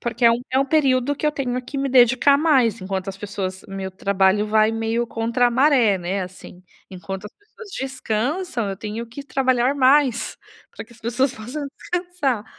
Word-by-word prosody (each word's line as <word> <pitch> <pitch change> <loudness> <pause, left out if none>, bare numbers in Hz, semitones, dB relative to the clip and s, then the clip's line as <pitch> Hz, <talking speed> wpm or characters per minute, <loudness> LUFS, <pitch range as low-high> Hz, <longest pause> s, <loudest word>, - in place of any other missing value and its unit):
Porque 240 0 -2
é 230 - +8
um 235 +1 0
é 260 - +2
um 275 - +3
período 275 -2 +2
que 300 - -3
eu - - +3
tenho 255 -4 -2
que 275 +3 -8
me 275 -1 -1
dedicar 260 +3 +5
mais, 270 -8 +2
enquanto 190 0 -4
as 195 0 -6
pessoas 195 -2 -5
meu 195 -1 -5
trabalho 195 +2 +1
vai 215 +1 +3
meio 225 +1 -1
contra 235 +2 +1
a - - -4
maré, 250 -6 +3
né, 185 +3 -2
assim. 180 0 -11 0.3
Enquanto 190 +2 -7
as - - -13
pessoas 420 +1 -15
descansam, 255 - -2
eu 195 - -5
tenho 220 +2 -5
que 240 +5 -9
trabalhar 260 -1 +1
mais 265 -3 +2 0.4
pra - - -7
que 235 - -18
as 220 - -20
pessoas 250 +4 0
possam 260 +7 -6
descansar. 350 - -2
240 Hz, 190 wpm, -22 LUFS, 210-275 Hz, 0.4 s, é